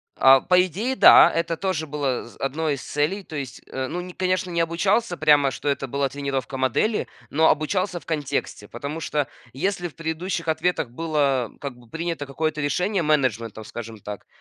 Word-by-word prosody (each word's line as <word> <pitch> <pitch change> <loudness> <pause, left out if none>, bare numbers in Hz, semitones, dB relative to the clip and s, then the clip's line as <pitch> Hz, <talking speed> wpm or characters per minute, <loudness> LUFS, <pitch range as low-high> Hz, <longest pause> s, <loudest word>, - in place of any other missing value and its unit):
А, 135 0 +7
по 180 0 +4
идее, 210 - -2
да, - - +8
это 165 0 -1
тоже 165 -5 -2
было 140 -3 -1
з 120 - -16
1 150 +2 -1
из 135 - -9
целей. 155 +8 -1
То 160 - -10
есть, 135 -3 -6
э, 130 0 -3
ну 175 - -4
не, 180 0 -9
конечно, 185 0 -1
не 170 -1 +1
обучался 175 +4 +1
прямо, 145 -3 +5
что 135 - -6
это 140 -1 -1
была 140 +2 0
тренировка 135 -2 -3
модели, 130 - +1 0.2
но 160 +2 +4
обучался 180 +3 0
в - - -21
контексте. 145 -8 -3
Потому 140 +8 -5
что 150 -3 -1 0.3
если 175 +5 -1
в 160 - -14
предыдущих 165 +1 -3
ответах 160 -3 0
было 140 -4 0
как 140 -4 -6
бы 120 -2 -19
принято 165 0 -3
какое-то 155 +2 -2
решение 180 +7 0
менеджментом, 115 -8 0
скажем 115 -1 -8
так, 105 0 -8
150 Hz, 185 wpm, -24 LUFS, 135-175 Hz, 0.3 s, да